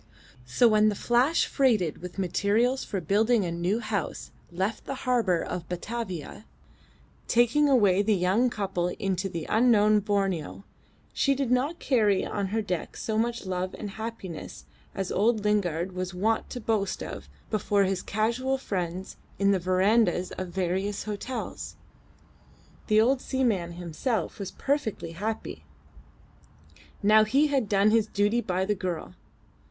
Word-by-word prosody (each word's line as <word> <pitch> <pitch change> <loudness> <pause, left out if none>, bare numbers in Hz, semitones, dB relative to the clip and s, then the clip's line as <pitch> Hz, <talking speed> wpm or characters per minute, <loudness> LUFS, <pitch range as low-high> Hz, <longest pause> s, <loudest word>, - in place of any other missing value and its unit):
So 235 - +4
when 215 -1 +4
the 210 - -2
Flash 245 +10 +2
freighted 220 - +1
with 180 +2 -9
materials 205 +7 +1
for 195 - -3
building 210 +5 +2
a 170 - -2
new 175 +6 0
house 215 -6 -3 0.2
left 190 +6 -2
the 270 - -4
harbour 225 -9 +2
of 175 -1 -5
Batavia, 190 0 -5 0.8
taking 240 +5 +3
away 205 -8 +4
the 210 +1 +2
young 190 +7 +2
couple 195 -6 -2
into 190 +1 -2
the 170 -3 -5
unknown 215 -2 +4
Borneo, 195 -4 -2 0.5
she 275 -1 +2
did 270 -2 -1
not 275 +7 +1
carry 210 - +2
on 200 -2 -2
her 220 +3 -1
deck 180 -5 -4
so 220 - -3
much 230 0 -1
love 185 0 -3
and 205 -2 -6
happiness 205 - -7 0.3
as 195 -2 -3
old 215 +1 +2
Lingard 190 -4 0
was 180 -1 -4
wont 220 +4 0
to 250 - -5
boast 215 -4 -1
of - - -8 0.2
before 205 -1 +2
his 190 -1 0
casual 235 +5 0
friends 185 -5 -4 0.2
in 200 0 +3
the 195 - +2
verandahs 185 +2 +2
of 185 - -5
various 190 +3 -2
hotels. 215 +5 -5 1.1
The 215 -1 +4
old 255 +4 +3
seaman 215 -11 0
himself 180 - -3
was 195 -2 -4
perfectly 270 - -2
happy. 190 - -4 1.4
Now 215 +1 +6
he 270 +8 +3
had 265 -8 0
done 200 +1 +4
his 220 -1 +3
duty 210 +3 +1
by 185 -3 -1
the 210 - +1
girl. 175 - -4
205 Hz, 145 wpm, -27 LUFS, 185-230 Hz, 1.4 s, Now